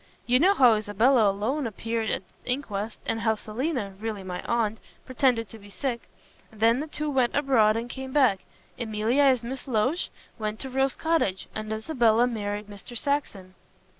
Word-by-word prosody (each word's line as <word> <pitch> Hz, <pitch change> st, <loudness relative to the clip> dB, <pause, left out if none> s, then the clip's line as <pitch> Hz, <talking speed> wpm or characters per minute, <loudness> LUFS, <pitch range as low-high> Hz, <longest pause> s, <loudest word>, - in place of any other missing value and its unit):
You 250 Hz, +1 st, +4 dB
know 380 Hz, +6 st, +5 dB
how 250 Hz, -4 st, +6 dB
Isabella 215 Hz, +2 st, +3 dB
alone 235 Hz, +8 st, -1 dB
appeared 225 Hz, +1 st, -3 dB
at -, -, -2 dB, 0.2 s
the -, -, -10 dB
inquest, 225 Hz, -5 st, -3 dB
and 225 Hz, -, 0 dB
how 220 Hz, -1 st, +2 dB
Selina 220 Hz, -1 st, -3 dB
really 215 Hz, -2 st, -4 dB
my 180 Hz, -1 st, -5 dB
aunt 225 Hz, -2 st, 0 dB, 0.3 s
pretended 250 Hz, -3 st, +1 dB
to 225 Hz, -, -11 dB
be 205 Hz, 0 st, -14 dB
sick. 235 Hz, +4 st, -4 dB, 0.4 s
Then 225 Hz, +3 st, +3 dB
the 305 Hz, -, -3 dB
two 300 Hz, 0 st, -4 dB
went 255 Hz, -3 st, +1 dB
abroad 235 Hz, -7 st, +3 dB
and 230 Hz, +1 st, -3 dB
came 265 Hz, +1 st, -7 dB
back; 255 Hz, -9 st, +4 dB, 0.4 s
Emilia 225 Hz, +3 st, +1 dB
as 260 Hz, -4 st, +4 dB
Miss 260 Hz, +4 st, -5 dB
Loach 255 Hz, +8 st, 0 dB, 0.3 s
went 215 Hz, 0 st, -3 dB
to 265 Hz, -, -4 dB
Rose 270 Hz, +1 st, +1 dB
Cottage, 320 Hz, -, 0 dB
and 215 Hz, 0 st, -5 dB
Isabella 230 Hz, 0 st, +2 dB
married 210 Hz, -3 st, -3 dB
Mr. 205 Hz, +4 st, -9 dB
Saxon." 220 Hz, -10 st, -2 dB
230 Hz, 170 wpm, -26 LUFS, 215-265 Hz, 0.4 s, how